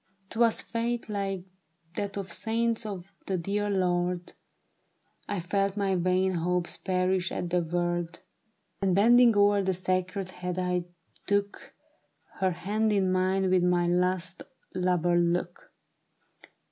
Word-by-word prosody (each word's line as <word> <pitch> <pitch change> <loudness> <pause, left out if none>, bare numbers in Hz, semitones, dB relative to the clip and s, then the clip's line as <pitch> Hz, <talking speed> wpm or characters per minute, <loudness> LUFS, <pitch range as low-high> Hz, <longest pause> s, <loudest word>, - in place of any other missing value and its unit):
" 195 0 -42
'Twas 230 -1 +3
faith 235 0 -2
like 195 -3 -2 0.5
that 200 -1 -3
of 190 -4 -5
saints 230 0 0
for 200 -5 -5 0.2
the 190 - 0
dear 205 +4 -1
Lord; 180 -2 0 1.0
I 205 -2 -1
felt 195 +3 -1
my 195 -2 +1
vain 185 +1 +2
hopes 175 +1 -1
perish 185 0 0
at 175 - -3
the 180 0 +2
word; 175 0 -2 0.6
And 190 -2 +2
bending 235 +2 +6
o'er 205 0 +5
that 190 -1 0
sacred 185 +1 -2
head, 180 -1 -5
I 180 -1 0 0.4
took 200 0 -1 0.6
Her 190 -1 +3
hand 205 +5 0
in 195 -3 +2
mine 185 +1 +1
with 185 -1 +4
my 180 -1 +3
last 180 0 0 0.3
lover 180 -1 +2
look. 175 0 -1
185 Hz, 135 wpm, -28 LUFS, 180-200 Hz, 1.0 s, bending